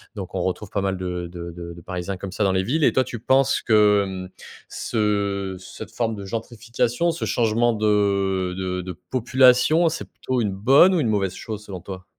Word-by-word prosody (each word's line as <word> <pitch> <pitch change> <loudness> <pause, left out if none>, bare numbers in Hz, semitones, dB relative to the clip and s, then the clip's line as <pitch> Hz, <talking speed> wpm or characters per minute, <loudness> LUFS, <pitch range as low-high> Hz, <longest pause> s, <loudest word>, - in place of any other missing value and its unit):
donc 95 -3 -7
on 95 - -1
retrouve 95 +3 -3
pas 100 - -2
mal 95 -1 -1
de 90 -1 -4
de 85 0 -8 0.2
de 85 - -12
parisiens 90 +2 -4
comme 95 +1 -7
ça 100 - -1
dans 95 - +3
les 95 0 +1
villes. 150 +10 0
Et - - +4
toi, 130 - +3
tu 120 - -7
penses 135 +3 +2
que, 105 -2 +4
mmh, 95 -1 -6 0.4
ce, 120 - -5 0.6
heu, - - -9
cette 95 - -10
forme 115 -2 -1
de 100 -1 -8
gentrification, 115 - -2
ce 165 - -4
changement 115 0 +2
de 100 -3 +1
de 90 -1 -2
de 90 0 -6 0.2
population, 130 +6 +4
c'est 160 - -5
plutôt 130 -1 -3
une 105 -3 0
bonne 135 - +5
ou 170 - +2
une 130 - +1
mauvaise 100 -3 0
chose 105 -2 -7
selon 95 -3 -7
toi? 95 0 -9
105 Hz, 205 wpm, -23 LUFS, 95-120 Hz, 0.6 s, bonne